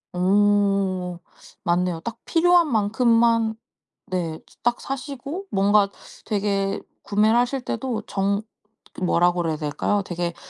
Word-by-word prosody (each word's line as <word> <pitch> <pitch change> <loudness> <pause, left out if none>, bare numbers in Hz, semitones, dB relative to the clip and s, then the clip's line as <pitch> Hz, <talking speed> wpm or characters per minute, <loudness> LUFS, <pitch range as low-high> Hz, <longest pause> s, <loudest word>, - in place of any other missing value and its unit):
오 195 -1 +2 0.4
맞네요. 175 -1 +1
딱 230 +5 -6
필요한 345 -2 +4
만큼만 230 +1 +3 0.6
네 165 -3 -2
즈 - - -24
딱 240 0 +1
사시고 280 +6 -5
뭔가 200 +1 +3 0.4
되게 200 -1 0 0.2
구매를 215 +2 +2
하실 245 +2 +1
때도 230 -2 -3
정 200 +1 0 0.5
그 - - -9
뭐라 175 0 +3
그래야 165 -3 -1
될까요? 150 +7 -1
되게 175 -1 -3
205 Hz, 230 characters per minute, -23 LUFS, 180-235 Hz, 0.6 s, 필요한